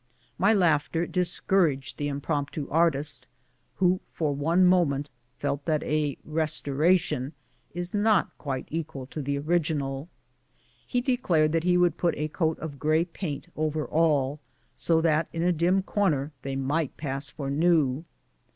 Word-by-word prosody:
My 195 Hz, +4 st, +4 dB
laughter 165 Hz, -4 st, +2 dB
discouraged 170 Hz, -5 st, +1 dB
the 145 Hz, -, -1 dB
impromp 145 Hz, 0 st, -2 dB
tu 150 Hz, -, -5 dB
artist, 155 Hz, -2 st, +1 dB, 0.5 s
who 185 Hz, 0 st, +2 dB
for 150 Hz, -3 st, -1 dB
one 165 Hz, +6 st, +3 dB
moment 150 Hz, -6 st, +2 dB, 0.3 s
felt 140 Hz, 0 st, -2 dB
that 155 Hz, -2 st, 0 dB
a 150 Hz, -3 st, 0 dB
" -, -, -24 dB
restora 155 Hz, +3 st, +2 dB
tion 150 Hz, -4 st, -4 dB, 0.2 s
" -, -, -39 dB
is 175 Hz, 0 st, -4 dB
not 210 Hz, -2 st, +2 dB
quite 135 Hz, -3 st, -3 dB
equal 150 Hz, -5 st, -4 dB
to 150 Hz, +3 st, -6 dB
the 140 Hz, 0 st, -1 dB
original. 150 Hz, -2 st, -1 dB, 0.8 s
He 245 Hz, -, 0 dB
declared 185 Hz, -, +2 dB
that 165 Hz, +1 st, 0 dB
he 180 Hz, 0 st, +4 dB
would 175 Hz, -2 st, +3 dB
put 175 Hz, -, +1 dB
a 150 Hz, +1 st, -2 dB
coat 160 Hz, 0 st, 0 dB
of 145 Hz, -4 st, -7 dB
gray 155 Hz, +2 st, +2 dB
paint 165 Hz, -3 st, -6 dB
over 155 Hz, 0 st, -1 dB
all, 150 Hz, -3 st, +1 dB, 0.3 s
so 165 Hz, -1 st, +2 dB
that 160 Hz, -1 st, +2 dB
in 165 Hz, -, -1 dB
a 180 Hz, -, +3 dB
dim 180 Hz, +4 st, +2 dB
corner 155 Hz, -9 st, 0 dB
they 135 Hz, 0 st, -4 dB
might 140 Hz, +3 st, -1 dB
pass 140 Hz, -1 st, -2 dB
for 140 Hz, -3 st, -5 dB
new. 155 Hz, -2 st, +2 dB
155 Hz, 160 wpm, -27 LUFS, 145-175 Hz, 0.8 s, My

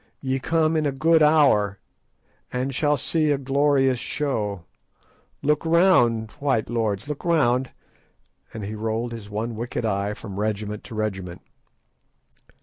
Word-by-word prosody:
Ye 135 Hz, 0 st, -1 dB
come 160 Hz, +3 st, +1 dB
in 155 Hz, -2 st, +1 dB
a -, -, 0 dB
good 160 Hz, +4 st, +3 dB
hour, 140 Hz, -11 st, +4 dB, 0.7 s
and 130 Hz, +2 st, -2 dB
shall 145 Hz, +2 st, +1 dB
see 155 Hz, +3 st, 0 dB
a 145 Hz, -, +2 dB
glorious 135 Hz, -1 st, +2 dB
show. 105 Hz, -, -3 dB, 0.8 s
Look 150 Hz, +1 st, +1 dB
round, 145 Hz, -, +3 dB
white 130 Hz, -6 st, 0 dB
lords; 110 Hz, -2 st, -1 dB
look 150 Hz, -1 st, -5 dB
round," 135 Hz, -7 st, +2 dB, 0.8 s
and 110 Hz, -, -7 dB
he 105 Hz, -, -5 dB
rolled 110 Hz, +2 st, -2 dB
his 110 Hz, -3 st, -8 dB
one 110 Hz, +3 st, -3 dB
wicked 120 Hz, +1 st, -3 dB
eye 100 Hz, 0 st, -1 dB
from 100 Hz, -3 st, -8 dB
regiment 105 Hz, 0 st, -3 dB
to 115 Hz, -, -9 dB
regiment. 95 Hz, -5 st, -4 dB
120 Hz, 140 wpm, -24 LUFS, 110-145 Hz, 0.8 s, hour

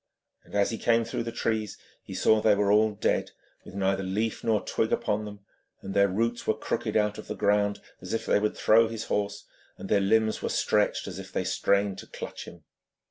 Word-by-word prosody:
As 100 Hz, +1 st, +1 dB
he 115 Hz, -, -4 dB
came 115 Hz, -1 st, +2 dB
through -, -, -3 dB
the 115 Hz, 0 st, -4 dB
trees 110 Hz, -2 st, -2 dB, 0.2 s
he -, -, -9 dB
saw 110 Hz, 0 st, +3 dB
they 105 Hz, -1 st, +4 dB
were 100 Hz, 0 st, +2 dB
all 105 Hz, 0 st, +3 dB
dead, -, -, 0 dB, 0.3 s
with -, -, -12 dB
neither 95 Hz, 0 st, 0 dB
leaf 105 Hz, +4 st, -2 dB
nor 110 Hz, -2 st, +1 dB
twig 110 Hz, -, -1 dB
upon 105 Hz, +1 st, 0 dB
them, 105 Hz, -1 st, -9 dB, 0.4 s
their 100 Hz, +1 st, +2 dB
roots 115 Hz, +5 st, -1 dB
were 110 Hz, -, +1 dB
crooked 110 Hz, 0 st, -2 dB
out 105 Hz, 0 st, 0 dB
of -, -, -10 dB
the -, -, -4 dB
ground 105 Hz, 0 st, +1 dB, 0.2 s
as 90 Hz, -, -7 dB
if 115 Hz, -, -2 dB
they -, -, +3 dB
would 105 Hz, +1 st, -1 dB
throw 115 Hz, +1 st, +5 dB
his 115 Hz, 0 st, -5 dB
horse, 100 Hz, 0 st, -2 dB, 0.3 s
and -, -, -8 dB
their 100 Hz, -, +3 dB
limbs 110 Hz, +2 st, +2 dB
were -, -, -2 dB
stretched 105 Hz, -1 st, +1 dB
as 95 Hz, -1 st, -6 dB
if 95 Hz, 0 st, -9 dB
they 95 Hz, -, -1 dB
strained 100 Hz, +1 st, +1 dB
to -, -, -10 dB
clutch -, -, -7 dB
him. 85 Hz, -2 st, -13 dB
105 Hz, 210 wpm, -27 LUFS, 100-110 Hz, 0.4 s, throw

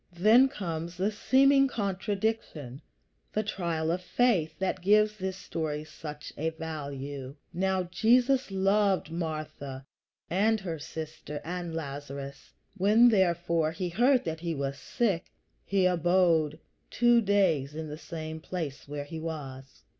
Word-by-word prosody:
Then 225 Hz, +8 st, +6 dB
comes 170 Hz, -7 st, -5 dB
the 195 Hz, +4 st, +1 dB
seeming 275 Hz, +5 st, +4 dB
contradiction 200 Hz, -, -2 dB, 0.5 s
the 215 Hz, -, +1 dB
trial 170 Hz, -6 st, -1 dB
of 180 Hz, +2 st, -1 dB
faith 180 Hz, -5 st, +1 dB
that 190 Hz, -1 st, -1 dB
gives 210 Hz, +3 st, +4 dB
this 190 Hz, -2 st, -4 dB
story 155 Hz, -5 st, -3 dB
such 150 Hz, -1 st, -9 dB
a 160 Hz, +2 st, +1 dB
value: 145 Hz, -4 st, -6 dB, 0.2 s
"Now 190 Hz, +1 st, +1 dB
Jesus 245 Hz, +9 st, +3 dB
loved 195 Hz, -2 st, +2 dB
Martha 155 Hz, -5 st, -5 dB, 0.4 s
and 215 Hz, +5 st, +2 dB
her 170 Hz, -4 st, -4 dB
sister 155 Hz, -1 st, -6 dB
and 175 Hz, -1 st, -4 dB
Lazarus. 140 Hz, -2 st, -6 dB, 0.2 s
When, 215 Hz, +6 st, +6 dB
therefore, 170 Hz, -5 st, +2 dB
he 180 Hz, +2 st, -3 dB
heard 245 Hz, +8 st, +3 dB
that 160 Hz, -1 st, -3 dB
he 170 Hz, -1 st, -3 dB
was 140 Hz, -1 st, -3 dB
sick, 200 Hz, -8 st, 0 dB, 0.4 s
he 195 Hz, -2 st, +1 dB
abode 175 Hz, -3 st, +3 dB, 0.3 s
two 240 Hz, 0 st, +4 dB
days 180 Hz, -9 st, +2 dB
in 160 Hz, 0 st, -4 dB
the 150 Hz, -, -6 dB
same 160 Hz, -1 st, -6 dB
place 160 Hz, -5 st, -5 dB
where 145 Hz, 0 st, -5 dB
he 160 Hz, +2 st, -7 dB
was." 140 Hz, -5 st, -7 dB
170 Hz, 130 wpm, -29 LUFS, 155-200 Hz, 0.5 s, Then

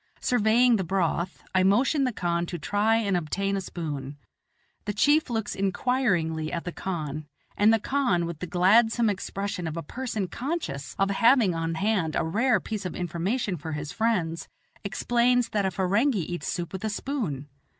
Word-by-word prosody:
Surveying 235 Hz, +1 st, +3 dB
the 190 Hz, -, -1 dB
broth, 175 Hz, 0 st, -1 dB
I 185 Hz, -, +4 dB
motion 255 Hz, +9 st, +3 dB
the 255 Hz, -, 0 dB
khan 170 Hz, -4 st, -1 dB
to 175 Hz, -, -4 dB
try 205 Hz, +7 st, +1 dB
and 205 Hz, -4 st, +1 dB
obtain 195 Hz, +4 st, -1 dB
a 195 Hz, -, -1 dB
spoon. 145 Hz, -6 st, -5 dB, 0.7 s
The 205 Hz, -, -2 dB
chief 290 Hz, +8 st, +3 dB
looks 225 Hz, -3 st, -2 dB
inquiringly 185 Hz, -6 st, 0 dB
at 170 Hz, 0 st, -4 dB
the 175 Hz, -, -3 dB
khan, 155 Hz, -5 st, -4 dB, 0.3 s
and 210 Hz, +2 st, +5 dB
the 225 Hz, -, +5 dB
khan 210 Hz, -9 st, +1 dB
with 170 Hz, -2 st, -6 dB
the 180 Hz, -, -5 dB
gladsome 225 Hz, +6 st, +4 dB
expression 195 Hz, -1 st, -4 dB
of 160 Hz, +1 st, -5 dB
a 165 Hz, -, -3 dB
person 225 Hz, -, -3 dB
conscious 240 Hz, -, -4 dB
of 195 Hz, 0 st, +2 dB
having 230 Hz, -2 st, +4 dB
on 165 Hz, 0 st, -2 dB
hand 190 Hz, -4 st, 0 dB
a -, -, +1 dB
rare 220 Hz, +7 st, +2 dB
piece 210 Hz, +2 st, -5 dB
of 180 Hz, -, -5 dB
information 180 Hz, +4 st, -2 dB
for 160 Hz, +1 st, -6 dB
his 150 Hz, 0 st, -4 dB
friends, 185 Hz, -8 st, -1 dB, 0.4 s
explains 240 Hz, +4 st, +1 dB
that 205 Hz, -2 st, 0 dB
a -, -, +1 dB
Ferenghi 200 Hz, -, +1 dB
eats 175 Hz, -, -4 dB
soup 175 Hz, 0 st, -3 dB
with 190 Hz, -, -5 dB
a 220 Hz, -, 0 dB
spoon. 205 Hz, -, -3 dB
195 Hz, 175 wpm, -26 LUFS, 170-230 Hz, 0.7 s, and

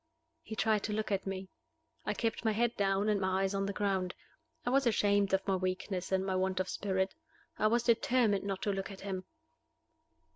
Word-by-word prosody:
He 220 Hz, -, -7 dB
tried 215 Hz, -1 st, +2 dB
to 210 Hz, -, -2 dB
look 215 Hz, 0 st, -2 dB
at 195 Hz, 0 st, 0 dB
me. 190 Hz, 0 st, -4 dB, 0.6 s
I -, -, 0 dB
kept 225 Hz, -1 st, -1 dB
my 220 Hz, -1 st, +2 dB
head 235 Hz, +2 st, +1 dB
down 195 Hz, 0 st, +1 dB
and 210 Hz, -2 st, +2 dB
my 190 Hz, 0 st, +1 dB
eyes 195 Hz, +1 st, 0 dB
on 195 Hz, 0 st, 0 dB
the -, -, -1 dB
ground. 190 Hz, -3 st, -1 dB, 0.5 s
I 245 Hz, -, +1 dB
was 270 Hz, -1 st, +3 dB
ashamed 205 Hz, -3 st, +3 dB
of 190 Hz, +1 st, +1 dB
my 195 Hz, -, +3 dB
weakness 185 Hz, 0 st, -2 dB
and 190 Hz, 0 st, +2 dB
my 190 Hz, -1 st, 0 dB
want 185 Hz, 0 st, 0 dB
of 185 Hz, -, 0 dB
spirit. 190 Hz, -1 st, 0 dB, 0.5 s
I 215 Hz, -, +4 dB
was 235 Hz, +2 st, +2 dB
determined 235 Hz, -3 st, +3 dB
not 195 Hz, -1 st, -3 dB
to 205 Hz, -, +1 dB
look 195 Hz, 0 st, -3 dB
at 195 Hz, -1 st, -9 dB
him. 190 Hz, -2 st, -4 dB
195 Hz, 210 wpm, -33 LUFS, 190-215 Hz, 0.6 s, I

